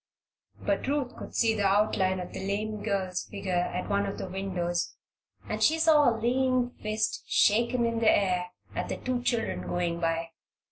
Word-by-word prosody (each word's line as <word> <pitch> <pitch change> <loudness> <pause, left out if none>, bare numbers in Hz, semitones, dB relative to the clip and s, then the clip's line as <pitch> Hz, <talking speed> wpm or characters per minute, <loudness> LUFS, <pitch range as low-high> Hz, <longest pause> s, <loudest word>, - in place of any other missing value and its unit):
But - - -1
Ruth 280 -3 -1
could - - -9
see 225 -2 +3
the 205 -2 +1
outline 195 -2 +2
of 180 - -7
the - - -5
lame 210 +2 -2
girl's 190 -4 -1
figure 200 -2 -5
at 180 +1 -1
one 200 0 +1
of 195 - -4
the - - -4
windows 180 -2 -2 0.5
and - - -3
she 320 - +4
saw 315 -4 +5
a 225 - -1
lean 250 +1 +1
fist 215 0 -1
shaken 235 +3 +3
in 230 0 0
the 225 -1 +4
air 180 -3 +2 0.3
at - - -3
the - - -2
two 250 -1 -2
children 235 -2 -1
going 175 -1 -1
by. 165 0 -1
205 Hz, 180 wpm, -28 LUFS, 185-235 Hz, 0.5 s, saw